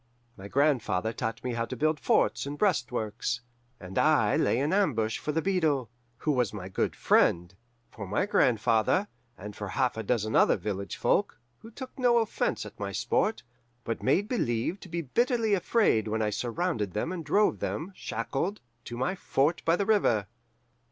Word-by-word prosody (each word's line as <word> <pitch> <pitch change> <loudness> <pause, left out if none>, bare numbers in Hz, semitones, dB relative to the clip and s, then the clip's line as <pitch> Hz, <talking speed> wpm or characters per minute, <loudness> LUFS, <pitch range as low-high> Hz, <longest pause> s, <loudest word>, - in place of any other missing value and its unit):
"My 95 0 -9
grandfather 115 -6 +1
taught 115 -1 -4
me 125 -1 -2
how 115 0 -1
to - - -6
build 155 0 +1
forts - - +1
and 145 +1 -5
breastworks, 120 - -1 0.4
and 95 0 -4
I 150 -9 +3
lay - - +2
in 145 +6 0
ambush 115 - +1
for 150 - -3
the 160 +1 -1
beadle, 155 - +1 0.3
who 150 - 0
was 125 -6 +1
my 95 -3 -6
good 95 - -1
friend, 85 +1 +2 0.4
for 100 -3 -8
my 105 - 0
grandfather, 120 - +2 0.3
and 105 +1 -8
for 105 - -5
half 120 +5 0
a - - -2
dozen 110 -1 -1
other - - +5
village 100 -3 -4
folk, - - +1 0.2
who 225 - -12
took 260 +3 -10
no 245 -2 +4
offense 225 -2 0
at - - -12
my - - -3
sport, 220 +1 0 0.4
but 115 - -3
made 185 +10 +2
believe 165 - -1
to 185 - -12
be 170 +1 -3
bitterly 230 - +1
afraid 190 - +2
when 110 +1 -1
I 105 - 0
surrounded 120 - -2
them 110 +11 -2
and 180 -3 -4
drove 210 +6 +2
them, 170 +6 -3
shackled, 135 - -3 0.3
to 120 - -6
my 130 +8 0
fort 160 -4 0
by 165 - +4
the 200 - -1
river. 190 - +2
130 Hz, 180 wpm, -28 LUFS, 110-180 Hz, 0.4 s, other